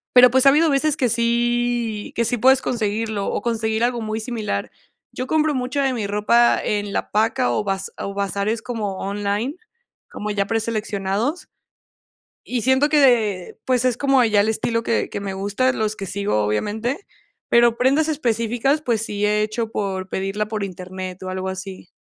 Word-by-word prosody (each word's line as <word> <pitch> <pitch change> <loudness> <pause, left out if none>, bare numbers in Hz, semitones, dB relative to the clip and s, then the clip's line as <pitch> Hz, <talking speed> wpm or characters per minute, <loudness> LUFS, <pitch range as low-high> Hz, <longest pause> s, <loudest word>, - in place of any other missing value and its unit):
Pero, 250 -1 +8
pues, 260 +1 +4
ha - - +9
habido 310 +4 +4
veces 290 +1 +2
que 250 - +1
sí 235 -1 0
que 235 - +1
sí 245 +2 0
puedes 260 +3 +5
conseguirlo 220 -3 -2
o - - -2
conseguir 220 0 -1
algo 240 0 +1
muy 220 0 -3
similar. 220 - -3 0.4
Yo 255 - -5
compro 310 0 +2
mucha 255 +2 -1
de 270 - +2
mi 225 -5 -2
ropa 210 +4 +3
en 205 -1 -2
la - - -2
paca 225 +4 +1
o 210 - -1
baz 195 -1 -2
o 200 - -4
bazares 200 +2 -1
como 210 -5 -4
online, 205 - -2 0.5
como 210 0 -5
ya 200 -1 0
preseleccionados. 220 - -2 1.0
Y 245 -2 -2
siento 265 +4 +3
que 300 0 +3
de 220 -9 +2
pues, 255 -1 +1
es 250 -2 +2
como 275 -2 +3
ya 215 -3 +3
el 210 - -1
estilo 230 +1 -1
que 230 - 0
que - - -4
me 200 -1 -4
gusta, 205 +7 0
los 215 -3 -2
que 195 - -5
sigo, 200 - 0
obviamente. 220 - -2 0.4
Pero 235 -1 +4
prendas 275 +6 +2
específicas, 245 0 0
pues, 235 -7 0
sí 205 -1 -1
he 210 0 +2
hecho 220 +1 -3
por 190 -2 -3
pedirla 195 +3 -2
por 215 -1 -4
Internet 185 -1 -6
o 185 - -4
algo 185 0 -3
así. 190 -1 -7
220 Hz, 180 wpm, -21 LUFS, 205-250 Hz, 1.0 s, ha